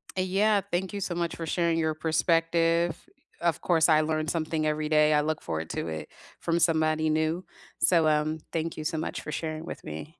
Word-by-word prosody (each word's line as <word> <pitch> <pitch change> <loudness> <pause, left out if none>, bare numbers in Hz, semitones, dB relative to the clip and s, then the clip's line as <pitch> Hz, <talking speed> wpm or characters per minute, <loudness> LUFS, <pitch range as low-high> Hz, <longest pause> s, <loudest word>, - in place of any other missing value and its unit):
Yeah, 195 +3 +2
thank 185 +3 -1
you 200 - -4
so 175 -2 -2
much 170 -1 -2
for 165 - -5
sharing 170 0 +1
your 160 -1 +1
perspective. 165 +1 +1 0.4
Of 170 -3 0
course, 165 -2 +3
I 155 0 +5
learn 155 0 -1
something 155 -1 -1
every 155 0 -1
day, 150 0 +4
I 150 - +4
look 155 +1 -2
forward 80 -1 -4
to - - -3
it 80 -1 -5 0.3
from 170 0 0
somebody 155 -1 +2
new. 160 +3 0 0.3
So, 165 -3 +4
um, 155 +1 +1
thank 165 0 -3
you 155 - -4
so 160 +1 -2
much 155 - -3
for 150 - -6
sharing 155 +1 -4
with - - -8
me. 80 - -7
160 Hz, 200 wpm, -27 LUFS, 155-170 Hz, 0.4 s, I